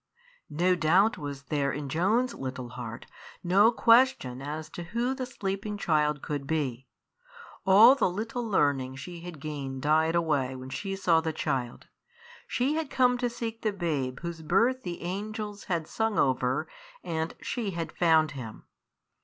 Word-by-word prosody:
No 175 +5 +2
doubt 180 +7 +3
was 140 -2 -6
there 140 -1 0
in 145 +1 -4
Joan's 210 - +1
little 130 -2 -6
heart, 120 -2 -7 0.4
no 195 +6 +5
question 230 - +3
as 150 +2 -5
to - - -7
who 235 +8 -1
the 260 -1 -4
sleeping 205 -3 -4
child 150 -5 +1
could 145 -2 -4
be. 135 -5 -2 0.8
All 215 +7 +9
the 275 - +1
little 225 +6 -3
learning 140 - +1
she 170 +6 -8
had 170 -2 -9
gained 140 -3 -5
died 160 +2 +3
away 145 -6 +1
when 130 0 -8
she 195 +8 -3
saw 170 -4 +3
the 160 0 -2
child. 125 -5 -3 0.6
She 260 +4 0
had 315 -2 -2
come 250 -1 +3
to 245 -1 0
seek 230 -1 -5
the 215 - +1
babe 150 -9 -2
whose 170 -1 -5
birth 230 +11 +2
the 175 -5 -6
angels 205 +3 -5
had 170 -4 -1
sung 220 -2 -1
over, 130 0 +1 0.4
and 160 0 -3
she 230 -5 -3
had 165 -1 -3
found 160 -2 +3
him. 120 -6 -8
165 Hz, 160 wpm, -28 LUFS, 140-210 Hz, 0.8 s, All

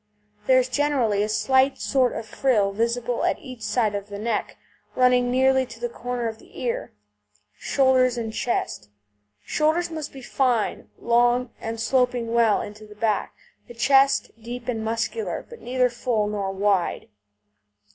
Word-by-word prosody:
There 260 - +6
is 255 -1 +3
generally 255 -7 +1
a 210 - 0
slight 265 +5 +2
sort 255 -2 +1
of 225 - -5
frill 220 -4 +1
visible 235 +3 -1
at - - +1
each 255 -3 -11
side 215 0 0
of 200 0 -5
the 200 - -6
neck, 220 +1 -2 0.4
running 250 -1 +4
nearly 265 +1 +3
to 235 - -12
the 240 0 -2
corner 245 0 -3
of 220 0 -6
the - - -14
ear. 240 -2 -3 0.7
SHOULDERS 255 -2 +3
AND 225 -2 -4
CHEST 105 - -2 0.6
Shoulders 315 +3 +1
must 315 -2 -5
be 270 -2 -11
fine, 245 -4 0
long, 240 +1 +2
and 225 0 -4
sloping 245 0 +1
well 230 -3 +3
into 215 +1 -10
the 210 - -13
back; 210 0 -1 0.3
the 240 - -11
chest 270 +3 +3
deep 240 +1 -7
and 225 -3 -2
muscular, 230 - -2
but 470 -2 -12
neither 250 0 +1
full 235 -3 -1
nor 205 -2 -2
wide. 195 -2 0
240 Hz, 155 wpm, -24 LUFS, 220-255 Hz, 0.7 s, There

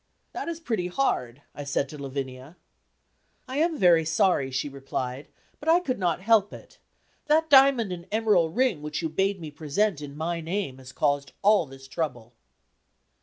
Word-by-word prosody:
"That - - -5
is 335 -1 -4
pretty 225 - -2
hard," 145 - -1
I 145 - -7
said 140 0 -1
to 150 - -9
Lavinia. 135 +2 -6 0.9
"I 260 +2 -4
am 325 +1 +1
very 175 -7 +5
sorry," 165 -3 +2
she 130 +2 -2
replied, 135 -1 -5 0.3
"but 310 - -3
I 335 +2 +6
could 260 - -3
not 180 -1 0
help 210 -1 +3
it. - - -13 0.5
That 315 +1 +2
diamond 265 -6 +6
and 175 0 -7
emerald 210 -7 +2
ring 245 - +1
which 150 +2 -4
you 160 - -1
bade 195 +4 0
me 155 -3 -7
present 155 +4 -1
in 145 0 -8
my 170 +2 -2
name, 165 -5 -3
has 130 0 -11
caused 145 -1 0
all 205 -5 +4
this 135 0 -13
trouble." 125 -4 -4
165 Hz, 170 wpm, -26 LUFS, 140-215 Hz, 0.9 s, I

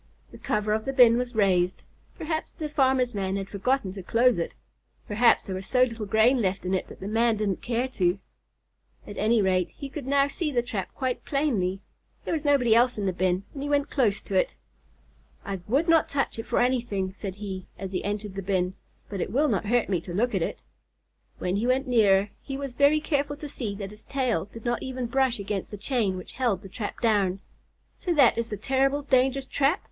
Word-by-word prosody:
The - - -12
cover 210 0 0
of 220 0 -1
the 270 - -2
bin 240 -3 +6
was 250 -1 -4
raised. 185 -3 +2 0.3
Perhaps 315 0 -3
the 315 -2 -4
farmer's 265 -4 +2
man 195 -2 -2
had 195 -1 -3
forgotten 205 0 -1
to 195 - -7
close 230 +2 +3
it. 170 - -3 0.5
Perhaps 230 +3 +4
there 190 - -4
was 185 +1 -5
so 255 -1 +4
little 230 -4 -2
grain 225 +5 +4
left 190 -2 -1
in 185 - -1
it 185 - -1
that - - -12
the 195 - -5
man 225 +1 +2
didn't 205 -3 -1
care 240 +2 -1
to. 185 -6 +1 0.9
At 205 - -8
any 220 0 +3
rate, 185 -2 +2
he 280 - -8
could 275 -1 -7
now 280 0 +3
see 300 +2 -2
the 240 -3 +1
trap 215 -6 -4
quite 255 -2 -2
plainly. 210 -11 0 0.4
There - - -1
was 315 -2 -1
nobody 275 -6 +4
else 245 +1 +4
in 205 - -2
the 190 - 0
bin, 185 +1 0
and 275 - -6
he 290 - -3
went 285 0 +1
close 225 -8 +1
to - - -7
it. 185 - +2 0.9
"I 195 -1 -3
would 280 +10 +2
not 330 -2 +4
touch 275 -4 -1
it 225 - -5
for - - 0
anything," 235 -7 0
said 195 -1 -6
he, 195 -3 -6
as 195 -1 -6
he 185 - -2
entered 205 0 -3
the 195 - -4
bin, 185 -1 0 0.3
"but 200 -3 -4
it - - -3
will 290 +6 +2
not 205 -2 -1
hurt 240 +1 +2
me 180 -4 0
to 175 0 -7
look 240 +5 +1
at - - 0
it." - - -3 0.7
When 180 +2 -1
he 225 +4 0
went 260 +2 +2
nearer, 205 -5 +4
he 270 - -5
was 275 -2 -5
very 285 +4 +4
careful 290 -1 -1
to 295 +1 -7
see 235 -8 -4
that 200 -1 -6
his 210 - -13
tail 255 -10 -1
did 220 +3 -12
not 240 0 0
even 260 -1 -4
brush 260 0 +1
against 200 -1 -4
the 205 - -7
chain 210 -3 0
which 185 - -9
held 230 -8 +1
the 195 - -9
trap 205 +2 -6
down. 200 -5 +2 0.6
"So 350 -2 -1
that 275 -5 +6
is 230 0 -2
the 210 - -4
terrible, 270 +5 +1
dangerous 265 0 +2
trap?" 285 +8 +1
230 Hz, 225 wpm, -26 LUFS, 195-265 Hz, 0.9 s, bin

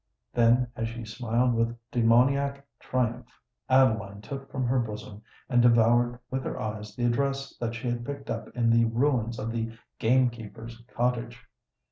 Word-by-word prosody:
Then, 120 +1 +4
as 115 - -2
she 115 0 -7
smiled 120 +2 0
with 115 +1 0
demoniac 140 +3 +3
triumph, 125 -2 -1 0.4
Adeline 110 -6 +3
took 135 +5 -7
from 130 -2 -1
her 130 +2 +2
bosom 105 -2 -5 0.3
and 125 -2 +3
devoured 120 +1 +4
with 130 0 -2
her - - -4
eyes 105 -1 -5
the 120 - -1
address 135 +3 0
that 115 -1 -3
she 120 +2 -5
had 120 0 -2
picked 140 +2 -6
up - - -4
in 115 -2 +2
the 115 0 +5
ruins 115 -1 +1
of 110 +1 -3
the 115 0 -3 0.2
gamekeeper's 115 -1 0
cottage. 120 0 -2
120 Hz, 155 wpm, -27 LUFS, 115-125 Hz, 0.4 s, the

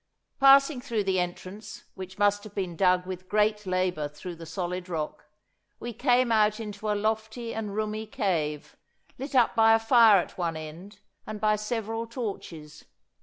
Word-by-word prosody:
Passing 275 0 +6
through 230 -5 -2
the 190 -1 +1
entrance, 190 +5 -6
which 190 0 -9
must 205 0 +2
have 215 -2 -12
been 185 -4 -3
dug 180 0 +3
with 185 0 -7
great 210 -1 +1
labour 185 -4 0
through 170 +4 -9
the 165 0 -10
solid 180 +2 -4
rock, 155 -2 -4 0.5
we 240 0 -6
came 245 +1 +2
out 215 0 +3
into 210 -1 -5
a 210 - +1
lofty 220 +2 -2
and 210 -2 -4
roomy 215 0 -3
cave, 170 - -2 0.4
lit 270 +1 -6
up 240 -2 +4
by 225 -1 +6
a - - +2
fire 225 -2 +6
at 180 - -6
one 165 -2 -1
end, 175 +6 -10 0.3
and 215 -1 -6
by 215 0 +3
several 225 +1 -3
torches. 170 - -7
210 Hz, 170 wpm, -27 LUFS, 180-225 Hz, 0.5 s, Passing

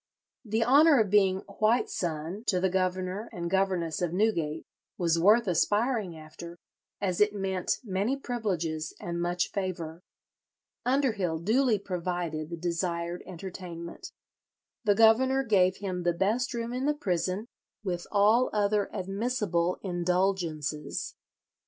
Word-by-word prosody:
The 220 0 0
honour 285 +3 +6
of 210 -4 +1
being 190 -2 +4 0.2
"white 220 +3 +3
son" 170 +4 -4
to 185 - +2
the 190 0 +1
governor 185 +3 -1
and 170 -1 -4
governess 185 -5 0
of 175 -2 0
Newgate 170 -7 0 0.3
was 170 -2 +2
worth 215 +7 +5
aspiring 205 +1 +1
after, 170 +2 -10 0.4
as 185 -2 -1
it 210 0 +4
meant 190 -2 -1
many 210 +5 -1
privileges 180 - -3
and 170 0 -4
much 175 0 0
favour. 175 -4 -4 0.9
Underhill 225 - +1
duly 225 +7 +2
provided 175 -5 -3
the 170 - -5
desired 170 0 -2
entertainment. 175 -2 -8 0.7
The 205 -1 +4
governor 260 +5 +5
gave 190 -5 +3
him 185 -3 -3
the 175 0 +1
best 225 +8 0
room 235 0 -3
in 255 +3 -1
the 300 - +2
prison, 185 - -1 0.4
with 175 -3 -3
all 215 +5 +4
other 205 -1 +1
admissible 195 -3 -1
indulgences. 175 -4 -1
190 Hz, 125 wpm, -28 LUFS, 175-215 Hz, 0.9 s, honour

